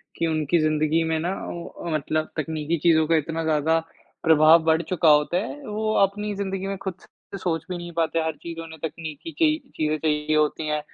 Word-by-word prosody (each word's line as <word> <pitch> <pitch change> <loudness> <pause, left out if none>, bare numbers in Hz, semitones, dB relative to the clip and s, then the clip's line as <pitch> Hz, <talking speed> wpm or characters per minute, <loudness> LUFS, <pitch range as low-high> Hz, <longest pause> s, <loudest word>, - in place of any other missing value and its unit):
कि 165 - 0
उनकी 155 +1 +1
ज़िंदगी 155 +1 +2
में 160 0 0
ना 175 +4 -1
वो 170 0 -6
अ, 170 - -8
मतलब 155 +1 -1
तकनीकी 155 +1 -1
चीज़ों 160 -2 +5
का 165 - +3
इतना 160 +1 -1
ज़्यादा 160 +1 +2 0.4
प्रभाव 160 0 +6
बढ़ 160 0 +3
चुका 170 -1 +2
होता 150 +3 +4
है, 225 +9 -4
वो 215 +1 -1
अपनी 205 +2 -1
ज़िंदगी 195 -1 -3
में 195 0 -3
ख़ुद 190 - -2
से 200 - -12
सोच 165 -4 -2
भी 180 - -3
नहीं 175 0 -7
पाते। 165 0 0
हर 160 -1 -2
चीज़ों 165 -1 -6
ने 160 0 -11
तकनीकी 160 - -6
ची 310 -2 +4 0.2
चीज़ें 155 0 0
चाहिए 150 0 0
होती 155 +1 +1
हैं 150 0 0
160 Hz, 205 wpm, -24 LUFS, 155-175 Hz, 0.4 s, प्रभाव